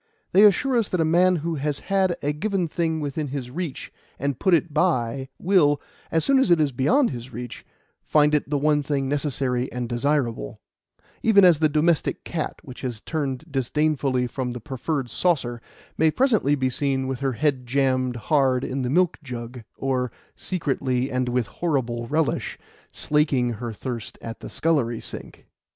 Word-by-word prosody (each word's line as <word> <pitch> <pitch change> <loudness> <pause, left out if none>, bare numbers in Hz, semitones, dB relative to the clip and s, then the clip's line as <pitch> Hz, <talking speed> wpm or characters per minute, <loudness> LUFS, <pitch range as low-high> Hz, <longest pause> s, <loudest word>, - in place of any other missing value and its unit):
They 195 - +6
assure 245 +6 +4
us 225 -4 +1
that 180 - -1
a 160 - +3
man 180 +3 +4
who 165 -2 -1
has 145 -1 0
had 190 -3 +1
a 145 +1 +1
given 190 +2 -1
thing 160 -1 -1
within 145 +1 -3
his 130 -2 -5
reach 165 -1 -5 0.2
and 140 -1 -2
put 190 -3 +4
it 165 -1 -1
by, 135 -5 0
will, 160 -6 +3 0.3
as 160 - +1
soon 275 -1 +4
as 265 - +3
it 170 -2 +5
is 150 -2 +2
beyond 230 - +2
his 125 -1 -7
reach, 120 +1 -7 0.4
find 150 0 +3
it 150 -2 +1
the 145 - +1
one 150 +1 +2
thing 140 -2 -1
necessary 135 -3 -1
and 125 -1 -3
desirable; 120 - -1 0.6
even 200 -4 +6
as 170 -4 +6
the 155 -1 +3
domestic 155 +2 +1
cat 165 -3 -3
which 130 -5 -10
has 120 -4 -4
turned 145 0 -3
disdainfully 135 -1 +1
from 125 0 -3
the 125 - -6
preferred 135 +3 -3
saucer, 120 -4 0 0.4
may 160 0 +5
presently 215 - +2
be 130 -2 0
seen 135 0 0
with 130 -2 -3
her 135 -1 0
head 135 -1 0
jammed 130 -1 +1
hard 130 +1 +2
in 135 +1 -2
the 125 - -1
milk 175 +4 +2
jug, 125 -2 -7 0.2
or, 130 -2 -1 0.2
secretly 135 -7 -1
and 130 -1 0
with 125 -1 +1
horrible 120 - -2
relish, 155 +3 -1 0.3
slaking 145 -5 +1
her 120 +1 -5
thirst 115 0 -6
at 115 0 -7
the - - -8
scullery 135 -8 0
sink. - - -9
140 Hz, 175 wpm, -24 LUFS, 125-160 Hz, 0.6 s, They